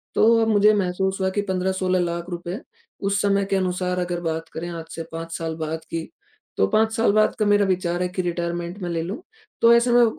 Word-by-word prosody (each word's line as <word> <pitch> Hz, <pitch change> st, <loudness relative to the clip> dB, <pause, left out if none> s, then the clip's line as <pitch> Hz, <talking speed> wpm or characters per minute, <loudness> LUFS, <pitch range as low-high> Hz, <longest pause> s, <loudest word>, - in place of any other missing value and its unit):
तो 230 Hz, +1 st, +5 dB
अब 225 Hz, -, +2 dB
मुझे 210 Hz, -1 st, +5 dB
महसूस 190 Hz, -1 st, 0 dB
हुआ 190 Hz, -, +2 dB
कि -, -, +3 dB
15-16 185 Hz, 0 st, 0 dB
लाख 170 Hz, 0 st, -2 dB
रुपए, 175 Hz, +3 st, -5 dB, 0.4 s
उस 200 Hz, 0 st, 0 dB
समय 200 Hz, -1 st, +2 dB
के 195 Hz, -, -1 dB
अनुसार 180 Hz, -1 st, 0 dB
अगर 175 Hz, -1 st, -2 dB
बात 165 Hz, -1 st, -3 dB
करें 170 Hz, +2 st, -5 dB
आज 165 Hz, -1 st, -6 dB
से 165 Hz, -, -4 dB
5 165 Hz, 0 st, -6 dB
साल 165 Hz, -1 st, -3 dB
बाद 160 Hz, 0 st, -3 dB
की, 165 Hz, -1 st, -4 dB, 0.5 s
तो 95 Hz, -, +3 dB
5 220 Hz, -, +2 dB
साल 225 Hz, -2 st, +3 dB
बाद 215 Hz, 0 st, +3 dB
का 215 Hz, -, +2 dB
मेरा 205 Hz, 0 st, +4 dB
विचार 180 Hz, -2 st, 0 dB
है 180 Hz, -, +1 dB
कि 185 Hz, +1 st, -2 dB
रिटायरमेंट 175 Hz, 0 st, -3 dB
मैं 175 Hz, -, -3 dB
ले 165 Hz, -1 st, -1 dB
लूँ। 195 Hz, -, -5 dB, 0.4 s
तो 230 Hz, 0 st, +7 dB
ऐसे 235 Hz, +1 st, +4 dB
में 240 Hz, 0 st, +6 dB
अ, -, -, +7 dB
180 Hz, 230 wpm, -23 LUFS, 170-200 Hz, 0.5 s, तो